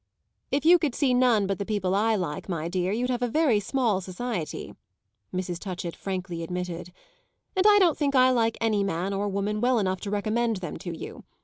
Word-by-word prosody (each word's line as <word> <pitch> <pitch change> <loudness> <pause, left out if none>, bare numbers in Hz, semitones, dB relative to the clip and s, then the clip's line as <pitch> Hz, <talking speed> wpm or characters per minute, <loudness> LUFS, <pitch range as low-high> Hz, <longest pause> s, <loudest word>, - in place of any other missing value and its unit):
"If 285 +2 -1
you 350 +2 +7
could 295 -7 -1
see 270 -4 +2
none 245 -5 +4
but 195 -1 -2
the - - -1
people 200 -3 -1
I 220 +3 +2
like, 175 -3 -4
my 165 -3 -2
dear, 180 +1 -1
you'd 245 +4 0
have 245 -1 -1
a 245 - +1
very 255 -3 +3
small 215 -2 0
society," 185 -2 -5 0.6
Mrs. 180 -1 -3
Touchett 180 -3 -5
frankly 185 -3 -4
admitted; 180 0 -5 0.6
"and 375 +2 +4
I 415 -1 +7
don't 360 -6 +3
think 280 -2 +1
I 255 0 +6
like 230 -2 +1
any 215 -3 +1
man 195 0 -2
or 200 +1 -1
woman 200 +2 -2
well 250 0 +3
enough 190 -3 0
to 205 - -4
recommend 220 +2 0
them 175 -4 -6
to 175 -4 -6
you. - - -8
205 Hz, 205 wpm, -26 LUFS, 185-245 Hz, 0.6 s, you